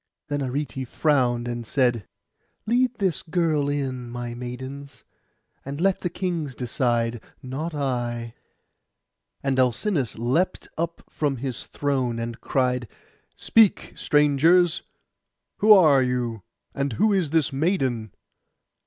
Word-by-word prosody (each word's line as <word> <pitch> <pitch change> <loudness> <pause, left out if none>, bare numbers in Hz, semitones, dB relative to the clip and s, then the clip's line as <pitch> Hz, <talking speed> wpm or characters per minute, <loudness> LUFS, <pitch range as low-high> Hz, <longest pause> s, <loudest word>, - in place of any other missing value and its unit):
Then 145 0 -1
Arete 135 -1 -3
frowned, 125 -5 +1
and 120 -1 -3
said, 120 -3 0 0.6
'Lead 245 +2 +2
this 190 -7 0
girl 160 -4 0
in, 130 -4 -3
my 120 0 -5
maidens; 130 +3 -8 0.6
and 140 +2 -6
let 190 +2 +2
the 175 - -2
kings 170 -6 -3
decide, 120 -2 0 0.2
not 150 +6 -4
I.' 120 -4 -2 1.1
And 135 -1 +1
Alcinous 130 - +1
leapt 130 +11 0
up 170 +1 -3
from 145 -3 -1
his 130 -1 -4
throne, 130 -5 -1
and 115 +1 -5
cried, 125 -2 0 0.5
'Speak, 225 -4 +3
strangers, 155 +4 +3 0.8
who 215 +1 +4
are 155 -9 +7
you? 125 -4 -1 0.3
And 140 -2 -2
who 210 - +2
is 185 -6 +1
this 155 -2 +1
maiden? 135 - 0
135 Hz, 120 wpm, -24 LUFS, 120-160 Hz, 1.1 s, are